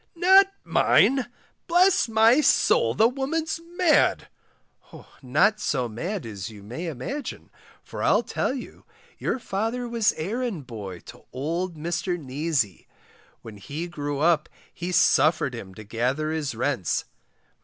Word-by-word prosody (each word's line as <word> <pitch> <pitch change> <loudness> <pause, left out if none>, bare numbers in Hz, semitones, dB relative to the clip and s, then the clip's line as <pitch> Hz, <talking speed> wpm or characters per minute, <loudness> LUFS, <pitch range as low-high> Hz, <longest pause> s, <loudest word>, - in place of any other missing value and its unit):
Not 380 +3 +6 0.2
mine! 265 -3 +3 0.4
bless 355 -4 +4
my 225 +5 +5
soul 480 +9 +3
the 220 - +5
woman's 310 +6 -2 0.2
mad. 350 -4 +3 0.9
Not 175 - +2
so 130 -10 -1
mad 170 - -5
as 100 -3 -6
you 105 -2 -12
may 125 - -6
imagine, 165 - -6 0.3
for - - -8
I'll - - +3
tell - - -2
you, 265 -2 -8 0.4
your - - -1
father 225 +2 -3
was 230 -2 +2
errand 205 - -3
boy 100 -7 -8
to - - -14
old 165 +7 -3
Mr 175 +3 -2
Neasy. 140 - -2 0.6
When 110 -2 -10
he 145 - -6
grew 145 -4 -4
up 160 -2 +2 0.2
he 175 +1 -5
suffered 155 -5 +3
him 95 -6 -9
to 110 - -10
gather 125 +8 -1
his 150 -5 -3
rents. 120 - -1
165 Hz, 135 wpm, -25 LUFS, -, 0.9 s, Not